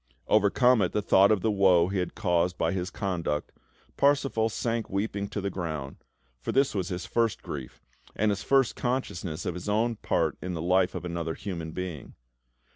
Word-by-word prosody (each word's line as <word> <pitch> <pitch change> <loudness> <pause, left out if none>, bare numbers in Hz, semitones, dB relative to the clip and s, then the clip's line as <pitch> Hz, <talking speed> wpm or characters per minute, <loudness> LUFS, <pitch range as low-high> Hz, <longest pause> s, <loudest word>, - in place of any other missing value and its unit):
Overcome 110 +3 +4
at 90 - 0
the 105 - +1
thought 95 +2 +5
of 105 -3 +2
the 110 - +1
woe 95 -4 +4
he 95 -1 -1
had 90 - -3
caused 90 -4 +1
by - - +1
his 95 -1 -2
conduct, 85 -6 -2 0.5
Parsifal 135 -5 +2
sank 115 +1 -2
weeping 100 0 -2
to 105 - -4
the 100 0 -2
ground; 80 -7 -4 0.4
for - - -3
this 135 +1 +2
was 95 -4 -1
his 90 -1 -4
first 115 -2 0
grief, 65 -4 -7 0.3
and 105 0 +2
his 100 - -2
first 135 -3 +2
consciousness 95 -10 -3
of 90 - -1
his 90 +4 -6
own 115 +2 +1
part - - 0
in 90 -1 -4
the - - -4
life 90 +2 +2
of - - -5
another 85 -2 -3
human 85 -6 -5
being. 85 -4 -6
95 Hz, 190 wpm, -28 LUFS, 90-110 Hz, 0.5 s, thought